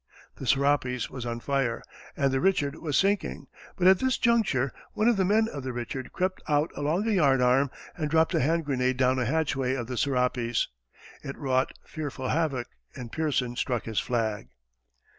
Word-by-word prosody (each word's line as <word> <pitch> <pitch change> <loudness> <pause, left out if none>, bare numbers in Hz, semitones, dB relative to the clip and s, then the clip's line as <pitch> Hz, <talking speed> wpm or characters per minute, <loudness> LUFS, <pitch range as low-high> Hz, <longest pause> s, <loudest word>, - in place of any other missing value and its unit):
The - - -7
Serapis 135 -3 +1
was 125 -2 -5
on 115 0 -3
fire 135 -4 -1 0.3
and 140 -2 +2
the 135 - +1
Richard 145 -4 +2
was 150 -4 -1
sinking, 200 +1 0 0.3
but 180 - -1
at 190 0 +7
this 260 -2 +1
juncture, 200 - +2 0.2
one 215 - +1
of 240 - +5
the 195 - +2
men 215 +4 +3
of 145 -9 -6
the 130 -1 -4
Richard 120 +2 -5
crept 185 +1 -2
out 150 +1 +2
along 165 +9 0
a - - +2
yardarm, 135 -6 +4 0.3
and 155 -3 -2
dropped 160 +1 +3
a - - +3
hand 165 +4 +1
grenade 130 -2 0
down 130 0 +2
a 125 - 0
hatchway 135 -2 0
of 120 -3 -3
the 125 +1 -5
Serapis. 125 -3 0 0.5
It 135 - -7
wrought 130 -1 0
fearful 140 -4 -5
havoc, 150 -7 0 0.3
and 120 -3 -8
Pearson 140 -6 -1
struck 120 -2 -1
his 110 -2 -1
flag. 110 - -1
135 Hz, 180 wpm, -27 LUFS, 125-160 Hz, 0.5 s, at